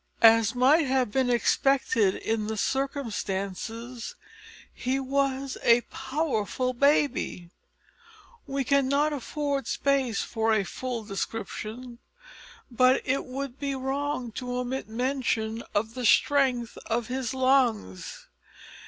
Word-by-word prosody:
As 225 0 +6
might 275 +5 +4
have 255 -4 +1
been 260 +2 +1
expected 240 -3 +2
in 220 -1 -2
the 220 0 -3
circumstances, 230 -3 -3 0.6
he 260 +2 -1
was 275 0 -1
a 235 +1 +5
powerful 260 -3 -2
baby. 280 - +1 1.0
We 275 0 -1
cannot 280 +2 +2
afford 285 0 -2
space 270 -5 +1
for 225 0 +1
a 205 - +2
full 245 +2 -4
description, 225 +3 -5 0.7
but 255 +2 +4
it 270 +2 0
would 270 0 -6
be 280 -1 -2
wrong 265 -1 -2
to 250 0 -3
omit 250 -1 -3
mention 230 -2 -1
of 220 +2 0
the 250 0 -5
strength 255 -5 +2
of 230 +1 0
his 260 +1 -3
lungs. 255 - +1
255 Hz, 110 wpm, -27 LUFS, 225-275 Hz, 1.0 s, As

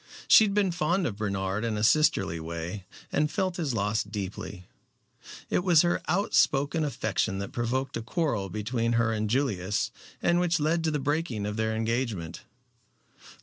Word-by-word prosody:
She 220 - +8
had 200 -1 -2
been 200 -3 +2
fond 175 +2 0
of 105 -8 -3
Bernard 100 0 -2
in 115 -2 -1
a 105 - -2
sisterly 110 - +3
way, 85 +4 -5 0.3
and 150 +1 +1
felt 185 0 -1
his 150 -8 -1
loss 105 +1 +1
deeply. 100 -2 -6 0.8
It - - 0
was 175 -4 +5
her 175 0 +1
outspoken 160 -5 +2
affection 110 -8 -1
that 100 0 -5
provoked 130 +3 -2
a 115 - -2
quarrel 115 - -1
between 115 +4 -1
her 115 -1 +2
and 110 -1 -1
Julius, 105 -7 0 0.3
and 175 0 +2
which 175 -1 +1
led 160 +3 +1
to - - +2
the 150 - 0
breaking 145 -6 -1
of 105 0 -3
their 110 0 -1
engagement. 110 -7 -2
115 Hz, 165 wpm, -28 LUFS, 105-155 Hz, 0.8 s, She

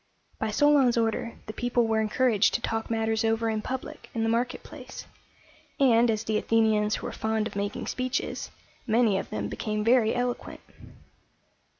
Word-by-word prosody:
By 220 - -1
Solon's 270 0 +4
order 230 0 -1
the 215 - -7
people 245 0 +1
were 220 -1 +1
encouraged 220 -1 +2
to - - -1
talk 225 -1 -2
matters 225 0 0
over 225 0 +1
in 215 -1 -2
public 260 +3 -6
in 225 - 0
the 225 - +1
market 240 +2 -1
place; - - -10 0.7
and, 240 -3 +5
as 220 -1 0
the 215 -1 0
Athenians 215 -2 +2
were - - -4
fond 220 -1 -1
of 215 - -6
making 200 0 -3
speeches, 255 +2 -3 0.4
many 220 -3 +3
of - - -7
them 105 -1 -3
became 210 - -3
very 230 -1 +3
eloquent. 245 0 -3
225 Hz, 165 wpm, -27 LUFS, 215-245 Hz, 0.7 s, and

